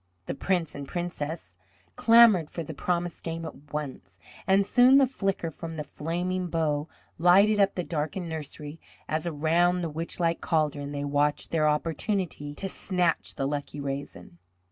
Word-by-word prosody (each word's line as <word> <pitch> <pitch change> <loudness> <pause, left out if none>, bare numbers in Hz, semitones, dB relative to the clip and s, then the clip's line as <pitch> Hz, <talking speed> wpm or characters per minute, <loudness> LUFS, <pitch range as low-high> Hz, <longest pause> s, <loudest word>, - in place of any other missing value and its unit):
The - - -3
Prince 175 +2 -1
and 140 -1 -7
Princess 160 - -5 0.4
clamoured 225 -8 +6
for 170 - -5
the 160 - -7
promised 175 +3 -2
game 165 0 -4
at 145 -2 -11
once, 130 -11 -6 0.3
and 195 +1 +4
soon 250 +5 +6
the 275 - +6
flicker 195 -9 -2
from 165 +1 -7
the 150 - -3
flaming 180 +5 -3
bow 155 -3 0 0.3
lighted 200 +5 +5
up 195 -1 +3
the 180 - -1
darkened 165 +2 -3
nursery 155 -1 -6 0.3
as, 155 +2 -1
around 170 +3 +2
the 165 - -3
witchlike 165 +2 -1
caldron, 150 -3 0
they 145 0 -3
watched 145 +1 0
their 155 -2 +3
opportunity 160 -1 -2
to 195 - -4
snatch 180 -3 -1
the 135 - -2
lucky 145 +1 -3
raisin. 135 -11 -6
165 Hz, 155 wpm, -27 LUFS, 150-180 Hz, 0.4 s, clamoured